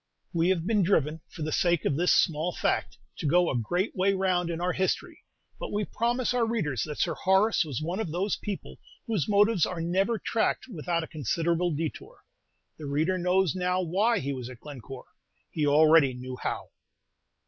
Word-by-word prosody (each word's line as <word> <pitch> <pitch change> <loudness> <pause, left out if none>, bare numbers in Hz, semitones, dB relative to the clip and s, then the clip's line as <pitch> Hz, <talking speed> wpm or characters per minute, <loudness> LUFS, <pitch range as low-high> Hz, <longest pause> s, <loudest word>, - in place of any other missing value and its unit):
We 170 +1 +2
have 175 -3 +1
been 210 0 +2
driven, 160 -4 +1
for 160 - -7
the 155 - -2
sake 175 0 +1
of 140 - +1
this 175 +4 +2
small 165 +2 +2
fact, - - -1 0.2
to - - -2
go 175 +3 +3
a - - -2
great 175 - -1
way 195 +1 +2
round 185 -2 0
in 165 -1 -3
our 180 +1 0
history; 190 0 -2 0.4
but - - -5
we 205 0 -1
promise 240 +4 0
our 245 -1 +2
readers 190 - -1
that 150 - -6
Sir 170 - 0
Horace 190 +6 +3
was 150 -3 -4
one 175 +5 -3
of 190 -8 -3
those 190 +5 0
people 205 -2 -7 0.3
whose 220 - -1
motives 205 -2 +4
are 180 - -5
never 190 +7 +1
tracked 225 +2 -1
without 170 - -2
a - - -7
considerable 170 +4 0
détour. 155 0 -4 0.6
The 150 - -6
reader 160 +6 0
knows 180 -1 +2
now 180 0 0
why 205 +7 +2
he 140 -6 -2
was 125 -2 -6
at 125 -2 -11
Glencore, 135 -2 -10 0.5
he 150 -2 0
already 150 -2 +5
knew 130 +1 -7
how. - - -4
175 Hz, 190 wpm, -27 LUFS, 155-190 Hz, 0.6 s, already